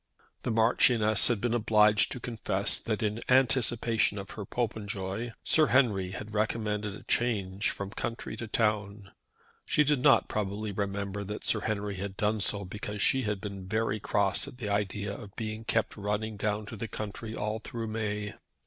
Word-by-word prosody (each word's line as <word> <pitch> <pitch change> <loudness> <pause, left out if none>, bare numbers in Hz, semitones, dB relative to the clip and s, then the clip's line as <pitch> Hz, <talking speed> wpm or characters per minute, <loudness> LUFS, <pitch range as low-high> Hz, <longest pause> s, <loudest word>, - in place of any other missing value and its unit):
The - - -3
Marchioness 110 -1 +4
had 120 -4 +2
been 120 +2 0
obliged 105 -2 +4
to - - -3
confess 110 -5 +1
that, 110 0 -2
in 105 +2 -1
anticipation 120 -4 +3
of 100 0 -6
her 105 - -6
Popenjoy, 105 -1 -3
Sir 155 -1 +4
Henry 105 -8 +3
had 105 +3 -7
recommended 105 -1 -1
a - - -12
change 100 -4 0
from 100 -1 -4
the - - -12
country 115 +1 -4
to 115 - -5
town. 105 -3 -1 0.5
She 150 - +3
did 145 -3 +2
not - - +5
probably 105 0 -2
remember 100 0 -3
that 105 +2 -6
Sir 110 - +3
Henry 105 -2 -2
had 95 0 -5
done 105 0 +1
so 100 +1 +1
because 105 +2 -6
she 130 - +3
had 105 -2 -1
been 100 -2 -7
very 110 +1 0
cross 100 -2 +1
at - - -10
the 110 -5 -4
idea 100 0 -1
of 100 -1 -11
being 110 0 -4
kept 110 -1 0
running 105 +2 -2
down 105 +1 -1
to 115 - -8
the 115 +2 -4
country 110 +1 -6
all 105 +1 -2
through 115 +1 -5
May. 105 -2 -3
105 Hz, 175 wpm, -29 LUFS, 100-115 Hz, 0.5 s, not